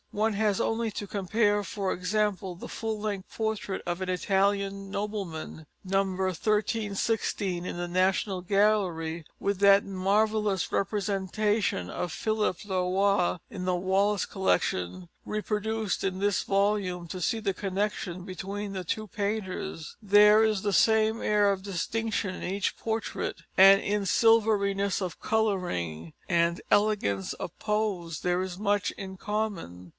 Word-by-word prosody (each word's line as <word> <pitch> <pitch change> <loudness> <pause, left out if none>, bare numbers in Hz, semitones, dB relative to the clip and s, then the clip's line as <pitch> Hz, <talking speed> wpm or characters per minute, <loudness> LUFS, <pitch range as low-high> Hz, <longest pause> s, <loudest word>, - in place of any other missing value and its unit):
One 215 +1 0
has 205 -1 +1
only 225 0 0
to 205 - -5
compare, 205 +1 +1
for 195 -1 -2
example, 190 0 -1
the 170 - -8
full 220 -1 -4
length 205 -3 -4
portrait 220 -3 -2
of 175 +1 -3
an 185 - -2
Italian 195 +1 0
nobleman, 195 -7 -5 0.2
No. 195 +1 +2
1316 195 0 -1
in 175 - -4
the 175 0 -3
National 185 +2 +1
Gallery, 180 -5 +1
with 200 -1 -1
that 200 0 +6
marvellous 200 -1 +1
representation 200 - 0
of 175 - -3
Philip 215 0 -1
le 190 -2 0
Roy 195 -2 +2
in 190 -3 -6
the 180 0 +1
Wallace 195 +3 +1
Collection, 90 - -1 0.2
reproduced 215 -1 -2
in 190 -1 -1
this 205 -1 +1
volume, 195 -3 0
to 185 +2 -6
see 225 +6 0
the 200 -3 -1
connection 190 -2 -3
between 195 +2 -5
the 190 -1 -4
two 215 +5 -3
painters. 200 -5 -4
There 210 +1 +6
is 215 -3 +1
the 205 -1 0
same 220 +3 +3
air 205 -1 +3
of 190 -1 -3
distinction 205 +1 -2
in - - -8
each 195 +2 -1
portrait, 220 0 -3
and 195 +1 +8
in 205 0 -1
silveriness 200 -3 +3
of 185 -3 -5
colouring 175 - -1
and 170 0 +2
elegance 205 - +2
of 170 - -7
pose 200 -7 -1
there 180 0 +1
is 185 -1 -4
much 205 -1 +1
in 190 -1 -7
common. 190 - -4
200 Hz, 140 wpm, -28 LUFS, 185-210 Hz, 0.2 s, and